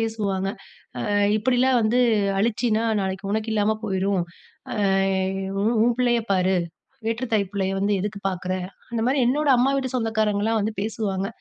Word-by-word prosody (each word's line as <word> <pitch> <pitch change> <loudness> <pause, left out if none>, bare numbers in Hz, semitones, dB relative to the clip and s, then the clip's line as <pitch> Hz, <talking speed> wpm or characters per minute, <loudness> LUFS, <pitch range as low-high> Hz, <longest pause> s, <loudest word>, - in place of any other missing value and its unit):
பேசுவாங்க, 205 -4 -1 0.6
அ - - -3 0.3
"இப்படிலாம் 250 +2 +2
வந்து 225 +3 +2 0.4
அழிச்சின்னா 225 +1 +1 0.2
நாளைக்கு 190 +1 -3
உனக்கு 220 +1 -1
இல்லாம 215 +1 +2
போயிரும், 195 -2 0 0.5
அ - - -4 0.8
உ - - 0 0.2
உன் 240 0 +2
பிள்ளைய 240 -1 +3
பாரு, 185 0 +2 0.5
வேற்று 230 +3 -1
தாய் 200 -3 +1
பிள்ளைய 195 -1 -1
வந்து 205 +1 +1
எதுக்கு 205 +1 -4
பாக்குற?" 185 0 -3 0.4
அந்த 230 - -1
மாரி 270 +2 +2
என்னோட 290 +4 +1
அம்மா 260 +3 +3
வீட்டு 260 -1 -2
சொந்தக்காரங்கலாம் 220 -2 +1
வந்து 215 +1 -2
பேசுவாங்க. 205 -3 -2
215 Hz, 145 wpm, -24 LUFS, 195-235 Hz, 0.8 s, பிள்ளைய